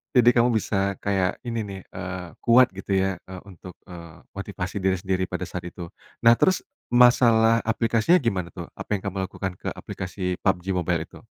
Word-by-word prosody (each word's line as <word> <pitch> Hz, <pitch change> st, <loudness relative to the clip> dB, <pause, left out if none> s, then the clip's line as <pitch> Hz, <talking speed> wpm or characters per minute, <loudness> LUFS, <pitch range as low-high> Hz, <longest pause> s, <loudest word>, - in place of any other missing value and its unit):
Jadi, 120 Hz, -1 st, +7 dB
kamu 120 Hz, 0 st, +4 dB
bisa 100 Hz, -2 st, 0 dB
kayak 95 Hz, -2 st, 0 dB
ini, 115 Hz, -2 st, -3 dB
nih. 100 Hz, -1 st, -7 dB
Eee, 90 Hz, -2 st, -7 dB
kuat, 125 Hz, +1 st, +5 dB
gitu, 95 Hz, +1 st, -5 dB
ya. 95 Hz, 0 st, +1 dB
Eee, 95 Hz, -1 st, -9 dB
untuk, 90 Hz, 0 st, -11 dB, 0.2 s
eee, 85 Hz, -1 st, -11 dB, 0.2 s
motivasi 100 Hz, -1 st, -5 dB
diri 95 Hz, -1 st, +1 dB
sendiri 95 Hz, -1 st, -1 dB
pada 90 Hz, 0 st, -5 dB
saat 90 Hz, -1 st, -6 dB
itu. 85 Hz, -1 st, -8 dB, 0.3 s
Nah, 115 Hz, 0 st, +6 dB
terus, 185 Hz, -, +3 dB, 0.3 s
masalah 115 Hz, -2 st, +6 dB
aplikasinya 115 Hz, +9 st, +2 dB
gimana, 95 Hz, -8 st, -2 dB
tuh? 85 Hz, -, -8 dB
Apa -, -, -4 dB
yang 100 Hz, -, -1 dB
kamu 95 Hz, 0 st, -3 dB
lakukan 95 Hz, -1 st, -5 dB
ke -, -, -4 dB
aplikasi 90 Hz, 0 st, -5 dB
PUBG 95 Hz, -1 st, +1 dB
Mobile 90 Hz, -1 st, 0 dB
itu? -, -, -15 dB
95 Hz, 180 wpm, -24 LUFS, 90-115 Hz, 0.3 s, Jadi